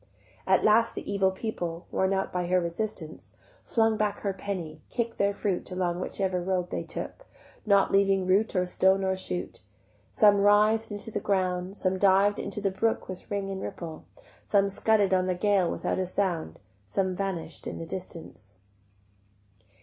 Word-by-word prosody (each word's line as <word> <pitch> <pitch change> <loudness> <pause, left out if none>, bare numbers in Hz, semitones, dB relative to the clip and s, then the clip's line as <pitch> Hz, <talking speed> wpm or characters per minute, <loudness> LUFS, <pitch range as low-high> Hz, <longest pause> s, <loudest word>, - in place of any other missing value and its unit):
At - - +4
last 225 +2 +4
the - - -6
evil 195 -1 +3
people, 180 -4 -4
Worn 190 0 +1
out 195 0 -1
by 180 -1 -1
her 185 +1 +3
resistance, 170 -1 -5 0.3
Flung 225 -1 +2
back 210 -1 -1
her 200 -2 -1
penny, 185 -5 -5
kick'd 235 -1 -3
their 200 0 +3
fruit 200 -2 -2
Along 180 -1 -1
whichever 185 -1 -1
road 180 -1 -1
they - - -2
took, - - -7 0.4
Not 200 -1 +4
leaving 195 -1 +3
root 200 +4 +2
or 180 0 +2
stone 190 +2 +3
or 190 0 +1
shoot; 180 -1 -4 0.5
Some 205 -3 +5
writh'd 210 +2 +4
into 210 +2 -6
the 205 - -2
ground, 185 -2 -1
Some 185 0 0
div'd 200 +1 +4
into 200 - -4
the 195 -1 0
brook 225 +4 0
With 185 -1 -8
ring 200 -1 -2
and 190 0 -5
ripple, 165 -2 -7 0.4
Some 200 -1 +2
scudded 205 -1 +2
on 185 0 +2
the 185 - 0
gale 195 -2 +2
without - - -2
a 185 - -1
sound, 175 - -2 0.3
Some 185 - -1
vanish'd 180 -4 -4
in - - -5
the 165 - -6
distance. 165 - -9
190 Hz, 170 wpm, -28 LUFS, 180-205 Hz, 0.5 s, Some